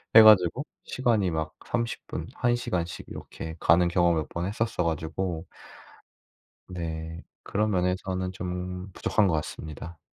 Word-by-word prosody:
해 110 - +13
가지고 110 - +6 0.2
시간이 115 -8 +1
막 80 -1 -2
30 115 0 -2
분, - - -4
1 120 -1 +2
시간씩 85 -8 -3
이렇게 80 0 -7
가는 85 +2 +5
경험을 85 -2 +3
몇 - - -8
번 85 +1 -3
했었어 105 -1 -1
가지고 80 +2 -2 1.2
네. 80 -2 -5 0.2
그런 105 +1 0
면에서는 95 0 0
좀 90 +1 -4
부족한 105 +2 +2
것 90 - +2
같습니다. 80 +1 -5
90 Hz, 260 characters per minute, -27 LUFS, 85-100 Hz, 1.2 s, 해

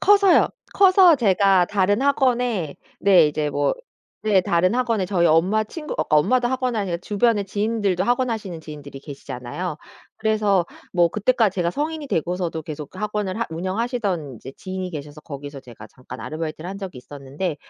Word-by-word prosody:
커서요. 400 -2 +5 0.3
커서 370 -4 +6
제가 195 -5 +4
다른 205 +4 +1
학원에 245 - +1 0.2
네 185 -5 +6
이제 150 0 -1
뭐 145 0 0 0.5
네 210 -3 +4
다른 180 +4 +1
학원에 230 -6 0
저희 180 -3 +1
엄마 185 +7 +3
친구 300 +7 -7
어 - - +1
엄마도 240 +12 +3
학원 255 -2 -1
하니까 195 -5 -1
주변에 205 +3 +1
지인들도 205 -2 -1
학원 245 +4 +1
하시는 200 -8 -4
지인들이 145 -3 -10
계시잖아요. 140 +4 -6 0.4
그래서 210 -5 +1 0.3
뭐 175 -2 +4
그때까지 215 -1 +1
제가 175 -2 0
성인이 300 - -3
되고서도 170 - -2
계속 150 -1 -7
그 185 - -13
학원을 210 -2 -2
하 230 - 0
운영하시던 185 - -2
이제 130 - -10
지인이 185 -1 -5
계셔서 150 -1 -8
거기서 140 -1 -8
제가 115 -4 -12
잠깐 130 +1 -11
아르바이트를 155 +1 -5
한 195 - -6
적이 190 -9 -7
있었는데 145 +5 -5
185 Hz, 390 characters per minute, -22 LUFS, 155-225 Hz, 0.5 s, 커서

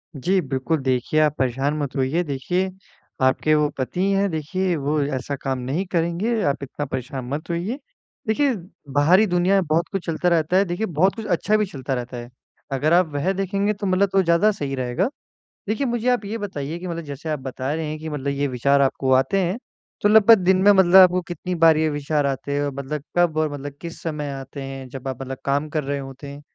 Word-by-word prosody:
जी 185 +8 +1
बिल्कुल, 135 +2 -1
देखिए, 130 +3 0
आप 150 -1 +3
परेशान 135 +3 0
मत 145 -1 -3
होइए। 140 +6 +1
देखिए, 175 +6 -1 0.5
आपके 130 +4 +3
वो 150 0 +3
पति 135 +7 -2
हैं 195 0 +2
देखिए 175 +4 -1
वो 150 0 0
ऐसा 140 0 -3
काम 135 -1 -3
नहीं 140 +10 -2
करेंगे, 180 +6 0
आप 140 0 0
इतना 140 +2 -5
परेशान 130 -1 -5
मत 155 +5 -4
होइए। 180 +10 -2 0.5
देखिए 265 +4 +2 0.4
बाहरी 175 +9 +5
दुनिया 180 +2 +2
में 190 -3 +2
बहुत 165 +2 +1
कुछ 195 -3 -3
चलता 170 +2 0
रहता 170 +1 +2
है। 195 - +4
देखिए, 175 +5 -2
बहुत 185 +1 +1
कुछ 225 - -6
अच्छा 210 +3 +1
भी 210 - +1
चलता 135 -6 -5
रहता 125 0 -4
है। 120 0 -8 0.4
अगर 145 +5 +1
आप 180 0 +5
वह 145 +7 0
देखेंगे 195 +2 0
तो 200 -1 -4
मतलब 190 +1 +2
वो 195 - +6
ज़्यादा 170 +5 +4
सही 140 -9 -4
रहेगा। 125 - -1 0.6
देखिए 225 +6 0
मुझे 240 +1 0
आप 245 -4 +1
ये 215 +3 -3
बताइए 165 -6 -5
कि 180 - -6
मतलब 170 -1 -4
जैसे 145 +2 -7
आप 150 -2 -1
बता 130 +1 -4
रहे 160 0 -2
हैं 155 - -4
कि 160 0 -6
मतलब 145 -2 -4
ये 140 0 0
विचार 140 +2 +2
आपको 135 -1 +1
आते 135 +9 +3
हैं 180 +3 -1 0.4
तो 205 - +4
लगभग 220 +1 +7
दिन 185 +1 +4
में 205 +1 +7
मतलब 190 -2 +4
आपको 185 -1 +8
कितनी 175 +1 -4
बार 165 -1 +5
ये 155 0 +2
विचार 145 0 -1
आते 140 +1 -2
हैं 145 0 0
मतलब 140 +1 -4
कब 170 -3 +3
और 155 -1 +1
मतलब 145 0 -6
किस 170 -1 -8
समय 150 -3 -3
आते 135 +1 -7
हैं 135 -1 -7
जब 135 0 -8
आप 130 0 -4
मतलब 135 0 -5
काम 145 +2 0
कर 150 -1 -2
रहे 140 +1 -2
होते 135 +1 -9
हैं? 140 +1 -9
155 Hz, 220 wpm, -22 LUFS, 140-185 Hz, 0.6 s, आपको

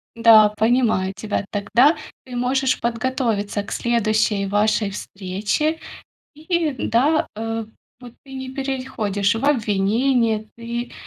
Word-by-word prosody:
Да, 225 -2 +7
понимаю 220 -3 +1
тебя. 210 -1 -3
Тогда 235 +9 +3 0.3
ты 255 -1 -9
можешь 255 +2 +1
подготовиться 230 -4 -1
к - - -11
следующей 220 -3 +1
вашей 205 +1 +1
встрече. 205 - -2 0.6
И 320 0 -1
да, 285 +8 +2
э, 225 +1 -3 0.4
вот 245 -2 -11
ты 270 - -14
не 260 -1 -6
переходишь 255 -7 -2
в 225 +4 -3
обвинение, 225 -1 +1
ты, 235 +1 -5
230 Hz, 115 wpm, -21 LUFS, 210-260 Hz, 0.6 s, Да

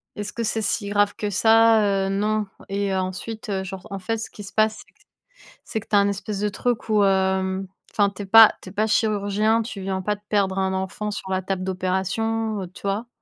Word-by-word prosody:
«est 210 - -4
ce 205 - -6
que 230 - -3
c'est 220 0 0
si 205 0 0
grave 205 0 +2
que 210 - -3
ça? 225 +2 +5 0.3
Heu, - - -2
non», 210 +2 0 0.2
et 200 0 -1
ensuite, 190 +4 -4
heu, 190 -1 -1
genre 190 +2 -8
en 195 - -4
fait, 225 +5 -2
ce 220 - -5
qui 205 - -11
se 195 - -10
passe, 215 0 +1 0.8
c'est 220 - -3
que 215 - -14
tu 210 - 0
as - - +7
un 200 0 +3
espèce 200 +1 -4
de 210 0 0
truc 240 +2 -2
où, 210 -2 +4
hem 190 0 +1 0.2
enfin 205 -1 +2
tu - - -6
es - - -7
pas 225 +2 +8
tu 185 - -10
es - - -12
pas 215 +2 0
chirurgien, 215 +1 +1
tu 210 -4 -7
viens 190 0 -2
pas 210 +2 -1
de 205 - -21
perdre 195 -2 +1
un 190 0 0
enfant 190 +3 -3
sur 195 -2 -6
la 185 0 0
table 190 0 -3
d'opération, 195 +4 -1
heu, - - -6
tu - - -14
vois? 200 +4 -2
205 Hz, 235 wpm, -23 LUFS, 190-215 Hz, 0.8 s, pas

